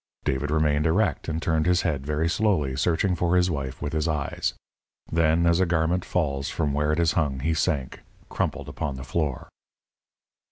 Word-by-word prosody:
David 70 +2 -1
remained 75 0 +2
erect, 85 -2 +1
and 80 0 -2
turned 80 0 +1
his 90 -1 +3
head 75 -6 -1
very 75 +2 0
slowly, 85 -8 +1
searching 85 +6 +1
for 85 +1 +1
his 90 0 +3
wife 70 -4 -4
with 75 - -3
his 80 0 0
eyes. 75 -3 -2 0.6
Then, 80 +1 +3
as 85 0 +4
a 95 - +3
garment 85 +2 +1
falls 70 -6 -1
from 75 -3 -1
where 75 +1 +1
it 75 - 0
is 85 -2 +3
hung, 70 -6 0
he 80 +4 +1
sank, 75 -4 -1 0.3
crumpled, - - -2
upon 70 -2 -4
the 65 - -7
floor. 70 -1 -2
80 Hz, 185 wpm, -25 LUFS, 70-85 Hz, 0.6 s, as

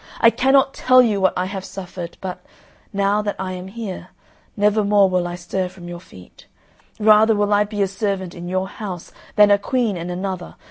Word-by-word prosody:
I 230 - +6
cannot 270 +2 +3
tell 255 0 +5
you 210 -4 0
what 190 - +3
I 180 - 0
have 190 0 -5
suffered, 180 -3 -8
but, 185 -1 -6 0.5
now 200 +1 +1
that 205 -1 -3
I 190 -1 -4
am 185 0 -7
here, 195 -4 -7 0.5
never 210 +1 +3
more 200 -1 +4
will 180 -1 0
I 175 - -5
stir 180 +1 -3
from 180 -1 -12
your 175 0 -7
feet. 90 - -16 0.5
Rather 215 +1 +5
will 205 0 +1
I 205 0 +3
be 205 -1 -1
a - - +1
servant 195 -2 -3
in 175 0 -7
your 185 +1 -1
house 190 -4 -7 0.2
than 210 -1 +6
a 200 - +5
queen 230 -3 -1
in 170 +1 -5
another. 185 0 -5
195 Hz, 200 wpm, -21 LUFS, 180-210 Hz, 0.5 s, I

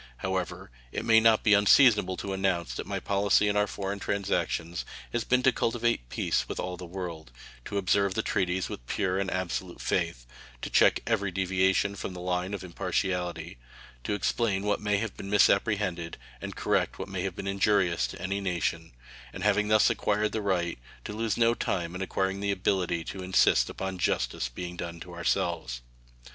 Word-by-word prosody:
However, 95 -8 -3 0.2
it - - -3
may 115 -1 +7
not 110 -1 +4
be 105 - +5
unseasonable 105 -2 +5
to 100 - -4
announce 95 -3 0
that - - -5
my - - -2
policy 100 +1 +2
in 105 - +1
our 105 0 +3
foreign 100 0 -4
transactions 85 -4 -1 0.3
has - - 0
been 125 0 +2
to 130 - +6
cultivate 115 - 0
peace - - -1
with - - -4
all 90 - -3
the 90 0 -9
world; 85 -6 -6 0.3
to 100 - -3
observe 100 0 +2
the 110 - 0
treaties 95 -2 0
with - - -8
pure 95 -1 0
and 100 -1 -1
absolute 90 -1 -3
faith; - - -1 0.4
to - - -4
check - - +5
every 105 -4 0
deviation 95 +1 +1
from 95 -1 -5
the - - -7
line 90 +2 -1
of 100 - -7
impartiality; 90 -4 -2 0.4
to 105 - -1
explain 105 -2 0
what 105 -1 0
may 105 -1 +1
have 110 0 -3
been 100 - -7
misapprehended 100 -4 +2 0.2
and - - -6
correct - - 0
what - - -5
may 95 -2 -4
have 95 -1 -3
been - - -6
injurious 100 - +2
to - - -9
any 100 +1 -2
nation, 85 -5 -2 0.4
and 95 - -7
having 105 0 +3
thus 110 0 +5
acquired 105 +1 0
the 110 - -2
right, 90 -7 -1 0.2
to - - -6
lose 110 -1 -1
no 115 0 +4
time 85 -7 -2
in 90 - -5
acquiring 95 0 -1
the 100 0 -2
ability 90 -3 0
to 95 - -6
insist 90 -9 +3
upon 95 -1 -5
justice - - 0
being 90 +8 -6
done 85 -1 -6
to - - -10
ourselves. - - -1
95 Hz, 185 wpm, -28 LUFS, 90-105 Hz, 0.4 s, may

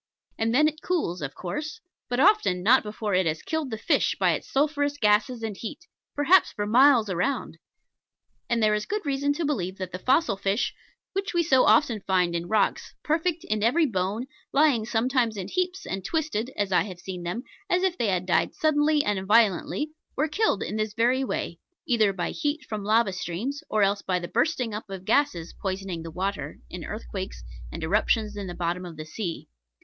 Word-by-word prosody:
And 225 0 +1
then 295 +6 +5
it 310 +1 -4
cools, 245 - -1
of 145 -1 -5
course; 300 - -5 0.3
but 245 +1 -1
often 340 - +4
not 250 +6 +6
before 210 -1 -4
it 185 -1 +3
has 155 0 -2
killed 320 -4 -2
the 220 - -4
fish - - +1
by - - +4
its - - -3
sulphurous 290 0 +1
gases 225 0 +2
and 220 -2 -3
heat, 290 - -7 0.3
perhaps 315 +6 +4
for 205 - -3
miles 245 +1 +5
around. 185 +8 -2 0.9
And 235 -2 +1
there 215 0 +4
is 210 0 -1
good 420 -2 -3
reason 280 0 +1
to 320 +2 -2
believe 190 -10 -2
that 185 -1 -5
the 185 - -5
fossil 260 - +2
fish 200 +3 0 0.4
which 390 -1 -2
we 340 - +3
so 265 -6 +4
often 240 -9 +4
find 180 -3 +1
in 170 0 -2
rocks, 215 0 0
perfect 320 +2 0
in 215 0 -1
every 300 +10 +3
bone, 205 0 -1 0.3
lying 275 -7 +3
sometimes 240 -1 +1
in 190 - -5
heaps, 365 +1 -2
and 195 0 -4
twisted 285 - -1
(as 205 -2 0
I 180 - +4
have 185 -4 -8
seen 180 0 -6
them) 175 +8 -4 0.3
as 360 +1 +2
if 375 -2 +1
they 235 - 0
had 185 -2 0
died 180 - +1
suddenly 300 -1 +3
and 205 -2 -1
violently, 225 - +3 0.2
were 305 - +1
killed 315 - +1
in 210 - -4
this 215 -1 -2
very 245 +4 +2
way, 170 -9 -3 0.3
either 220 -5 +3
by 180 -3 -3
heat 295 -1 -2
from 215 -2 -4
lava 215 -1 +3
streams, 215 - -4
or 215 -1 +2
else 200 +1 +2
by 185 -1 0
the 175 -1 -4
bursting 245 - 0
up 210 0 -6
of 190 -1 -7
gases 200 - +1
poisoning 190 -3 -3
the 165 - -7
water, 195 +4 -3
in - - -6
earthquakes - - -6 0.3
and - - -6
eruptions 210 +4 +1
in 200 -2 -5
the 175 - -6
bottom 175 +1 -2
of 170 -3 -9
the 155 - -6
sea. 170 +1 -5
220 Hz, 200 wpm, -26 LUFS, 190-290 Hz, 0.9 s, not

